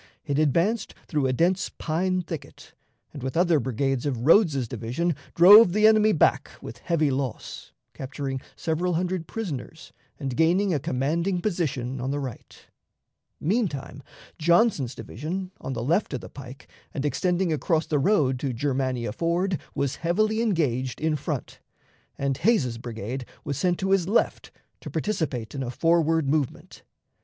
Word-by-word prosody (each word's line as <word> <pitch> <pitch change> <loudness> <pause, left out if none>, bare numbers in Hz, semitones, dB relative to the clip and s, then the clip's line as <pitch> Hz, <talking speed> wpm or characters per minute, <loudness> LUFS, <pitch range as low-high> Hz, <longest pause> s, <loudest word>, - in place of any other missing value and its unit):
It 145 -1 0
advanced 170 - +1
through 150 -6 0
a - - +1
dense 175 +8 +1
pine 180 +3 -1
thicket, 165 -3 -9 0.4
and, 145 - -8
with 130 +5 -3
other 170 -3 +4
brigades 130 +2 -1
of 125 -3 -2
Rodes's 155 - +4
division, 125 +9 -2 0.2
drove 185 +2 +9
the 215 +1 +3
enemy 215 0 +6
back 160 - +2
with 115 - -9
heavy 155 -3 +1
loss, 130 -2 -4 0.2
capturing 135 0 -5
several 170 +2 -1
hundred 180 -1 -2
prisoners 160 - -6 0.3
and 135 -4 -3
gaining 175 +6 +3
a 150 - +1
commanding 165 +9 -1
position 140 - -2
on 130 - -2
the 145 +1 -1
right. 130 -5 -8 0.7
Meantime, 155 - -2 0.4
Johnson's 170 - +3
division, 180 - -5
on 135 - -4
the 115 - -3
left 165 - +1
of 125 - -5
the 90 - -10
pike, 135 -1 -11 0.3
and 140 - -2
extending 180 +3 0
across 160 +1 0
the 150 - 0
road 140 -7 +2
to 135 -1 -2
Germania 130 -3 -1
Ford, 170 - 0 0.2
was 140 -2 -1
heavily 215 +6 +1
engaged 135 - 0
in 155 0 +1
front, 145 - -5 0.6
and 135 -1 -1
Hays's 150 - +1
brigade 120 +2 -5 0.2
was 140 - -3
sent 175 +5 +1
to 190 0 -1
his 190 -3 +3
left 215 +4 0 0.3
to - - -8
participate 140 - -2
in 135 - -4
a 125 - -3
forward 165 +2 +2
movement. 145 -2 -2
155 Hz, 150 wpm, -25 LUFS, 130-180 Hz, 0.7 s, drove